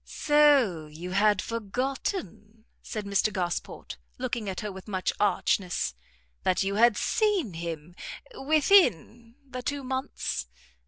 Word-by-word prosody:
"So 280 - +3
you 165 +4 -8
had 205 0 +3
forgotten," 230 - -4 0.2
said 215 -3 -5
Mr 200 +2 +1
Gosport, 180 -3 -4 0.2
looking 240 -4 -3
at 185 - -4
her 210 -1 -4
with 190 +1 -11
much 190 -3 -1
archness, 185 - +1 0.5
"that 185 +1 +1
you 195 +1 -1
had 225 +1 +4
seen 405 - +1
him 165 0 -6 0.4
within 270 - +3
the 255 -1 -6
two 285 +2 -3
months? 260 - -3
215 Hz, 120 wpm, -27 LUFS, 185-260 Hz, 0.5 s, had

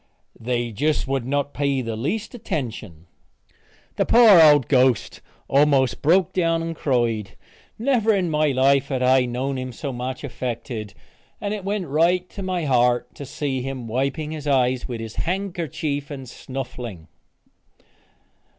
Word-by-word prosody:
They 120 0 -2
just 145 +7 0
would 135 -2 -2
not 145 +1 -1
pay 140 -2 0
the 115 -1 -4
least 185 - -3
attention." 115 - -5 0.9
The - - +2
poor 225 -7 +8
old 145 -5 +6
ghost 130 -4 +2 0.3
almost 140 -2 +3
broke 175 +3 +3
down 165 -2 +1
and 165 0 -4
cried. 120 -8 -1 0.4
Never 230 -2 +2
in 185 -5 +1
life 140 -2 +2
had 130 -2 -2
I 130 0 +4
known 130 +2 -3
him 130 0 -5
so 140 0 -5
much 125 +3 -5
affected, 120 -5 -5 0.4
and 205 0 -3
it 210 -2 -5
went 200 -1 -2
right 170 +5 +2
to 200 - -7
my 185 -3 -2
heart 125 -2 +2
to 140 - -9
see 135 -2 -3
him 130 -2 -5
wiping 140 +6 -2
his 150 -2 -6
eyes 130 -2 +1
with 120 -2 -5
his 110 -1 -8
handkercher 170 -6 -2
and 135 -3 -7
snuffling. 120 -9 -7
135 Hz, 145 wpm, -23 LUFS, 125-165 Hz, 0.9 s, poor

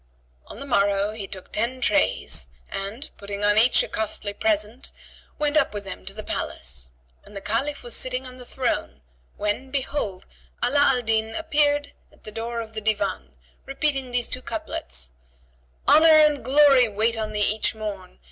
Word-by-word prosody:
On - - -10
the 280 - -6
morrow 200 -4 +2
he 215 -2 -6
took 190 -1 -10
ten 240 +4 -1
trays 90 - +1 0.2
and, 205 +9 -5
putting 200 0 -5
on 205 0 +4
each 240 +3 +5
a - - -5
costly 210 -1 -3
present, 215 +3 -1 0.5
went 300 0 0
up 280 -8 +2
with 205 - -4
them 195 -1 -8
to 195 - -3
the 215 - -7
palace; - - -2 0.3
and 205 - -16
the - - -4
Caliph 250 +9 -2
was 240 - -2
sitting 255 0 -1
on 255 0 -8
the 250 - -10
throne 240 - -2 0.4
when, 210 +6 -2
behold, 260 -8 -2 0.4
Ala 275 +4 +2
al 270 -3 +4
Din 220 0 0
appeared 295 -2 +1 0.2
at - - -25
the 215 - -7
door 230 +2 -4
of 225 -1 -9
the 220 - -4
Divan, 200 - -1 0.3
repeating 275 -1 -1
these 245 -1 0
two 255 - -4
couplets, - - -4 0.8
"Honour 315 +1 +7 0.2
and 295 -2 0
Glory 270 -1 +6
wait 220 +2 +1
on 215 -1 -3
thee 210 -1 -1
each 215 +1 +1
morn! 200 -4 -6
225 Hz, 175 wpm, -24 LUFS, 205-260 Hz, 0.8 s, Honour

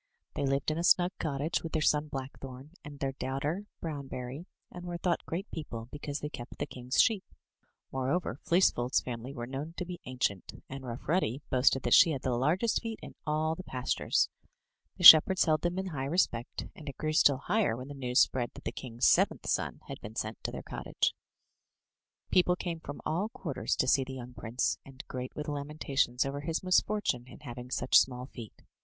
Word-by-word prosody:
They 140 - -1
lived 135 +2 +1
in 155 - -2
a - - -1
snug 175 0 +5
cottage 150 +1 -1
with 165 - -7
their 155 - +1
son, 150 0 +2
Blackthorn, 135 0 -7
and 145 -1 -9
their 135 -1 -1
daughter, 140 +9 -3 0.2
Brownberry, 140 0 -5 0.2
and 180 - -9
were 175 -1 -4
thought 170 0 0
great 185 +5 -3
people, 115 -7 -6
because 145 0 -5
they 150 - -2
kept 120 -4 -9
the 145 - -2
king's 130 -2 -3
sheep. 220 -5 +4 0.7
More 130 0 -1
over, 165 -5 -1
Fleecef 175 -6 +3
old's 125 +2 +2
family 125 +1 -6
were 120 -4 -5
known 140 +6 -6
to 180 - -3
be 175 0 -7
ancient; 125 -7 -3
and 135 0 -7
Rough 120 -1 -7
Ruddy 150 -5 0
boasted 130 0 +3
that 120 - +2
she - - +8
had 135 - -5
the 130 - 0
largest 165 - +1
feet 225 -1 -5
in - - -9
all 155 +1 +1
the 185 - -7
pastures. 130 -6 0 0.7
The - - -6
shepherds 180 +4 +10
held 155 -2 +2
them 175 +1 -1
in 190 - -1
high 135 -5 -3
respect, 135 -7 0
and 150 -2 -8
it 140 - -9
grew 155 0 -1
still 140 -3 +5
higher 195 - +1
when 125 +1 -7
the - - -6
news 125 -3 +2
spread 120 -2 +1
that - - -11
the - - -2
king's 120 -2 -3
seventh - - +3
son - - -1
had - - -7
been 110 +1 -9
sent 110 0 -4
to - - -1
their - - -6
cottage. - - -1 1.2
People 180 -1 +4
came 170 -2 -4
from 145 -2 -8
all 185 +7 0
quarters 160 - -3
to 130 - +1
see 135 0 +4
the 130 0 -7
young 125 -1 -8
prince, 120 +1 -1
and 135 -1 -11
great 125 -1 -6
were 150 - -3
the 150 - -4
lamentations 140 -3 0
over 140 +1 -3
his 160 +2 -2
misfor 185 +3 +2
time 125 -1 0
in - - -13
having 125 -2 -8
such 130 - +5
small 125 -1 -1
feet. 115 -4 -11
140 Hz, 210 wpm, -31 LUFS, 130-165 Hz, 1.2 s, shepherds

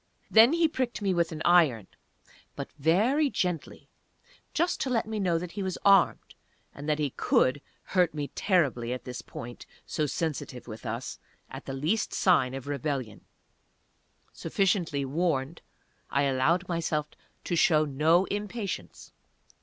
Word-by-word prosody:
Then 225 +6 +7
he 335 -1 +3
pricked 255 -7 -3
me 195 -2 +2
with 170 -1 +1
an 155 -1 -5
iron 155 - +4 0.7
but - - -6
very 215 - +2
gently 180 - -3 0.6
just 340 +3 0
to 265 - -1
let 235 -3 +1
me 220 0 -4
know 180 -4 +1
that 175 +1 -5
he 200 - -5
was 190 -2 -3
armed, 195 -2 +4 0.4
and 145 +2 -7
that 150 - +2
he 145 -3 -1
could 130 +3 +2 0.2
hurt 180 -3 +2
me 145 -2 -3
terribly 135 - +1
at 125 - -6
this 125 -1 -6
point, 120 +1 -9 0.2
so 155 -2 -1
sensitive 145 -5 -4
with 110 +1 -8
us, 115 +4 -5 0.3
at - - -8
the 135 - -5
least 160 +11 -1
sign 135 -9 +3
of 135 - -7
rebellion. 140 -5 -3 1.1
Sufficiently 175 -8 0
warned, 150 0 -1 0.5
I 140 - +1
allowed 140 +7 +1
myself 160 -3 -1 0.3
to 175 - -2
show 155 -2 +4
no 155 +6 +3
impatience. 205 - -5
165 Hz, 145 wpm, -28 LUFS, 135-190 Hz, 1.1 s, Then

